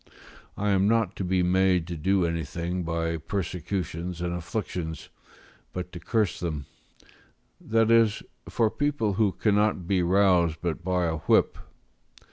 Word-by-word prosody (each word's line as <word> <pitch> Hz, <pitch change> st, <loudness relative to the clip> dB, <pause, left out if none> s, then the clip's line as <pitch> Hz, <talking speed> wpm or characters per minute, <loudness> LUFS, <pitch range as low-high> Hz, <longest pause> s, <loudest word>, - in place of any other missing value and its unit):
I 105 Hz, 0 st, 0 dB
am 95 Hz, 0 st, +3 dB
not 110 Hz, -3 st, +1 dB
to -, -, -2 dB
be 90 Hz, 0 st, +1 dB
made 90 Hz, -1 st, +3 dB
to 85 Hz, 0 st, -5 dB
do 95 Hz, +3 st, +1 dB
anything 85 Hz, +2 st, -3 dB
by 85 Hz, -1 st, -2 dB
persecutions 90 Hz, 0 st, -4 dB
and 85 Hz, 0 st, -2 dB
afflictions, 90 Hz, -3 st, -4 dB, 0.6 s
but 90 Hz, -1 st, -5 dB
to 85 Hz, -, -8 dB
curse 105 Hz, +2 st, 0 dB
them: 80 Hz, -5 st, -3 dB, 1.0 s
that 115 Hz, 0 st, +2 dB
is, 115 Hz, -2 st, +4 dB, 0.3 s
for 110 Hz, -2 st, +1 dB
people 145 Hz, -8 st, 0 dB
who 105 Hz, 0 st, +2 dB
cannot 105 Hz, -3 st, +1 dB
be 95 Hz, -1 st, +2 dB
roused 90 Hz, -3 st, +3 dB
but 85 Hz, 0 st, -3 dB
by 90 Hz, -1 st, +1 dB
a 80 Hz, -1 st, -1 dB
whip. 80 Hz, -, +2 dB
90 Hz, 140 wpm, -26 LUFS, 85-105 Hz, 1.0 s, is